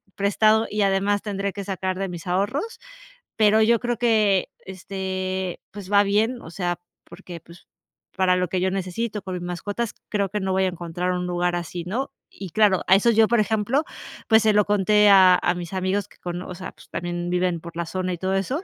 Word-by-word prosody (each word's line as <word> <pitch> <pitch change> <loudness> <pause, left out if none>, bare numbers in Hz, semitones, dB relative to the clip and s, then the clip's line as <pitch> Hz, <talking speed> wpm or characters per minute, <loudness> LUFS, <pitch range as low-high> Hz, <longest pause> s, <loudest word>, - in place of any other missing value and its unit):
prestado 215 +2 +3
y 210 - -1
además 200 +1 +1
tendré 200 -2 -3
que 200 - -6
sacar 190 -1 -3
de 195 -1 -2
mis 175 -2 -8
ahorros, 205 - -2 0.6
pero 215 0 +4
yo 230 +1 +4
creo 240 -1 -2
que, 215 -5 +2 0.2
este, 190 -1 -4
pues 200 -1 -9
va 205 0 +6
bien, 220 +5 0
o - - -10
sea, 175 0 -3 0.2
porque, 175 -2 -11
pues 170 +1 -17 0.5
para 185 -1 +3
lo 180 0 0
que 180 +1 -2
yo 190 0 +1
necesito 195 +3 -3
con 190 -2 -5
mis 180 -1 -5
mascotas, 205 +6 -4 0.2
creo 200 -2 0
que 210 +2 -2
no 190 -1 -2
voy 190 0 +2
a - - +2
encontrar 175 0 -3
un 180 0 -2
lugar 175 0 0
así", 175 0 -5
¿no?, 235 +11 -3 0.2
y 195 - -9
claro, 205 -1 +3
a 190 - +7
eso 220 +4 +4
yo, 220 -1 +4
por 235 +1 +2
ejemplo, 220 +7 0 0.5
pues 220 0 +6
se 215 -1 +4
lo 210 0 +4
conté 210 +1 +4
a 190 -2 +7
a - - +1
mis 175 0 -7
amigos 190 +1 -1
que - - -22
con 175 0 -5
o 180 - -7
sea, 185 +1 -7
pues - - -19
también 175 0 -4
viven 180 -1 0
por 170 0 -11
la 170 0 -2
zona 185 +2 -3
y - - -4
todo 190 +2 -1
eso, 255 - -2
190 Hz, 215 wpm, -23 LUFS, 180-210 Hz, 0.6 s, a